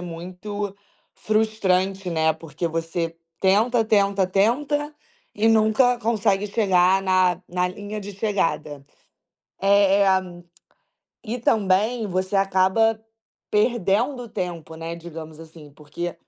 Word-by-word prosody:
muito 185 +4 -6 0.4
frustrante, 195 -3 0
né, 160 -1 +2
porque 160 +1 -5
você 165 0 -3 0.2
tenta, 225 +5 +3
tenta, 200 -3 +2
tenta 280 +10 0 0.4
e 220 - +1
nunca 225 +3 +3
consegue 210 -3 0
chegar 190 -3 +3
na 185 -1 +2
na 180 0 0
linha 205 +3 -7
de 205 0 -8
chegada. 165 -8 -2 0.8
Eh, 200 0 +4 1.2
e 235 +3 -4
também 220 +1 +1
você 185 +1 -1
acaba 195 +3 +2 0.5
perdendo 235 +3 +1
tempo, 170 -5 -5
né, 165 +1 -5
digamos 160 -2 -10
assim, 160 -2 -13
porque 155 +4 -6
195 Hz, 105 wpm, -23 LUFS, 175-215 Hz, 1.2 s, Eh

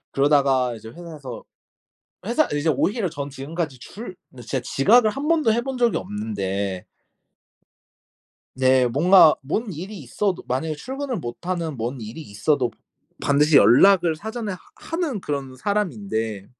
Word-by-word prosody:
그러다가 135 -3 +3
이제 110 0 -11
회사에서 150 -6 -9 0.8
회사 245 +7 +2
이제 145 +2 0
오히려 190 - 0
전 145 -3 -6
지금까지 145 0 -5
줄 185 - -9
근데 125 - -12
진짜 130 +3 -2
지각을 215 - +4
1 275 +7 -4
번도 310 -9 +3
해본 250 +3 -2
적이 240 -1 +2
없는데 100 -3 -3 1.7
네. 130 -1 +4
뭔가 160 +6 +6
뭔 200 - -2
일이 190 +6 -7
있어도 180 - -2
만약에 150 +5 -2
출근을 265 - -4
못 135 - -7
하는 170 -5 -2
뭔 120 +3 -4
일이 110 +7 -8
있어도 125 +3 0 0.5
반드시 145 +1 +3
연락을 165 - +6
사전에 220 +4 -5
하 180 - -7 0.2
하는 325 - -3
그런 140 -5 -4
사람인데 110 - -2
150 Hz, 295 characters per minute, -23 LUFS, 125-205 Hz, 1.7 s, 뭔가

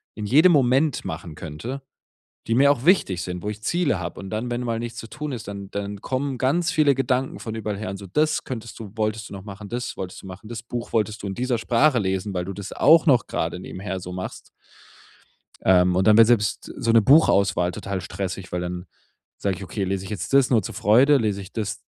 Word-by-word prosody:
in 105 - -5
jedem 155 - +6
Moment 140 0 +2
machen 80 0 -6
könnte, 95 - -6 0.7
die 115 - +1
mir 140 +3 +6
auch 135 -2 -2
wichtig 130 - +3
sind, 90 -1 -5
wo 105 - -2
ich 105 0 -6
Ziele 145 - +1
habe. 85 -1 -6
Und 95 - -7
dann, 110 +3 -2
wenn 120 +1 -1
mal 115 -2 -2
nichts 120 0 -6
zu 115 - -8
tun 150 0 -5
ist, 115 -6 -6
dann 100 -1 -7
dann 100 0 -4
kommen 135 0 -2
ganz 160 +7 +1
viele 145 -3 +3
Gedanken 130 0 -1
von 110 -1 -6
überall 105 -2 -3
her 110 -1 -5
und 100 - -6
so: 100 0 -10
„Das 155 - +1
könntest 115 -3 -7
du 105 -4 -8
wolltest 110 0 -2
du - - -10
noch 95 -1 -8
machen, 100 0 -9
das 120 +1 -4
wolltest 90 -1 -6
du - - -9
machen. 95 +3 -10
Das 115 -2 -6
Buch 120 0 -6
wolltest 110 -1 0
du - - -3
in 95 - -3
dieser 125 +1 0
Sprache 125 +3 +3
lesen, 95 0 -2
weil 90 -1 -2
du 100 - -5
das 100 0 -7
auch 160 +3 +5
noch 130 -7 +4
grade 85 +2 -2
nebenher 95 +1 -5
so 90 0 -8
machst.” 90 0 -7 1.2
Ähm, 90 -1 +4
und 95 +2 +2
dann 105 0 +7
wird 115 -1 +8
selbst 110 -4 +1
so 115 - +1
'ne 115 0 +6
Buchauswahl 100 - +4
total 100 -1 -4
stressig, 95 0 -5
weil 90 - -2
dann 90 0 -5 0.5
sage 95 -2 -1
ich: 100 - -8
„Okay, 100 +2 -4
lese 95 0 -2
ich - - -8
jetzt 105 +5 -5
das 135 -2 +5
nur 115 -5 +3
zur - - -6
Freude, 130 +8 +5
lese 105 -5 -1
ich 95 +1 -11
das 105 -3 -3
110 Hz, 235 wpm, -23 LUFS, 95-125 Hz, 1.2 s, wird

